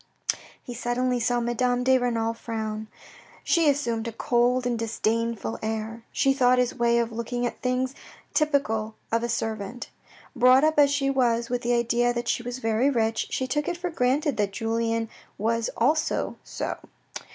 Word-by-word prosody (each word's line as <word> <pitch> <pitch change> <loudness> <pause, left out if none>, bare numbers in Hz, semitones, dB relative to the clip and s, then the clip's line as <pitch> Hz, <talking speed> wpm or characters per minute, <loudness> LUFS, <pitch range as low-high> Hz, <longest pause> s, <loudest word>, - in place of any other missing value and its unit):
He 245 - -7
suddenly 245 +1 0
saw 240 +1 +1
Madame 245 +1 0
de 260 +1 +4
Renal 230 -2 0
frown. 220 -2 -4 0.6
She 330 -3 +3
assumed 235 -5 0
a - - -3
cold 245 +2 +1
and 240 -2 0
disdainful 230 0 -1
air. 220 +1 -3
She 270 - +2
thought 255 -2 +4
his 250 -1 +2
way 235 -1 +2
of 235 -1 0
looking 235 +2 -3
at 240 - -4
things 255 +1 0 0.4
typical 225 -8 +1 0.2
of 230 0 +2
a 235 - -2
servant. 225 0 -3 0.4
Brought 255 +2 +6
up 310 -1 +3
as 285 -1 +6
she 275 -1 +1
was 235 -3 +1
with 245 0 0
the 240 0 +1
idea 240 +1 +2
that 240 0 -3
she - - +1
was 245 +1 -5
very 225 +2 +1
rich, 225 -4 0
she 260 - -1
took 290 +3 -1
it 350 - -2
for 355 0 -3
granted 275 -1 +1
that 205 -2 +1
Julien 230 0 -1 0.3
was 230 +2 0
so - - -4
also. 305 +7 +1
240 Hz, 170 wpm, -26 LUFS, 230-255 Hz, 0.6 s, Brought